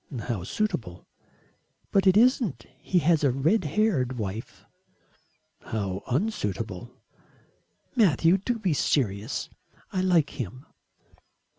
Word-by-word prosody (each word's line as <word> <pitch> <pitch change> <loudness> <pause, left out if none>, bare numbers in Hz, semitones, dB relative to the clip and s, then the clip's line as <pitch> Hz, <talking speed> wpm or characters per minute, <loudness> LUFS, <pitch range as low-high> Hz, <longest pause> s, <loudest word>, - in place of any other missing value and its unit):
"How 110 -5 -3
suitable." 95 - -3 0.9
"But 195 -1 +3
it 190 +1 +6
isn't. 225 - +3
He 185 - 0
has 165 -2 +4
a 140 - +5
red 155 - +2
haired 150 - +1
wife." 105 +1 -6 0.9
"How 100 -4 -3
unsuitable." 120 - -2 1.1
"Matthew, 185 - +4
do 235 +5 -2
be 195 -7 0
serious. 115 -5 0 0.5
I 185 - +1
like 175 -6 +3
him." 125 +5 -7
140 Hz, 105 wpm, -26 LUFS, -, 1.1 s, it